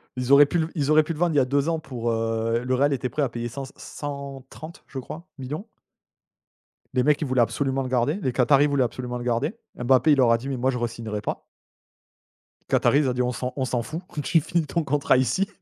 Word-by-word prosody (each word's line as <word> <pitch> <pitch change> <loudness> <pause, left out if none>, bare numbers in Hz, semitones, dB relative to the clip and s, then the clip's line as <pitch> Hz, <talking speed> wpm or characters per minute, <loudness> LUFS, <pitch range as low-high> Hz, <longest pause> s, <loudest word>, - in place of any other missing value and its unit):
Ils 125 +1 -2
auraient 145 +1 +9
pu 175 - -1
l 160 - 0
ils 145 -3 -1
auraient 155 0 +6
pu 165 - -3
le 155 - -9
vendre 175 -1 +2
il - - +3
y - - +7
a 130 - +3
2 140 +4 +1
ans 165 -1 0
pour, 120 -6 -3
heu, 115 +1 0
le 130 +1 0
Real 140 +2 +2
était 125 -1 -2
prêt 150 - -2
à 140 - +1
payer 120 0 -4
100-130 140 +3 -8
je 135 - -6
crois, 165 +7 -9
millions. 150 - -6 1.3
Les 125 - +2
mecs 150 +2 +3
ils - - 0
voulaient 130 -1 +2
absolument 135 +3 0
le 130 - -4
garder, 125 +4 +1
les 130 - 0
Qataris 140 +4 +4
voulaient 140 -2 +2
absolument 125 0 -4
le 120 - -6
garder. 125 - 0 0.2
Mbappé 130 +4 +3
il 145 - +5
leur 120 -3 +5
a 115 - +5
dit: 135 +4 -6
«Mais 135 - -2
moi 130 +2 +1
je 125 - -3
re-signerai 115 -3 -4
pas». - - -4 1.3
Qataris 145 0 +3
ont 125 - +1
dit: 125 - -1
«On 125 0 0
s'en 125 +1 -4
on 130 - -1
s'en 125 -2 -1
fout 160 +8 -6 0.2
tu 165 +2 +3
finis 165 +1 0
ton 165 +3 -1
contrat 140 -2 +2
ici». 130 - +1
135 Hz, 240 wpm, -24 LUFS, 125-145 Hz, 1.3 s, auraient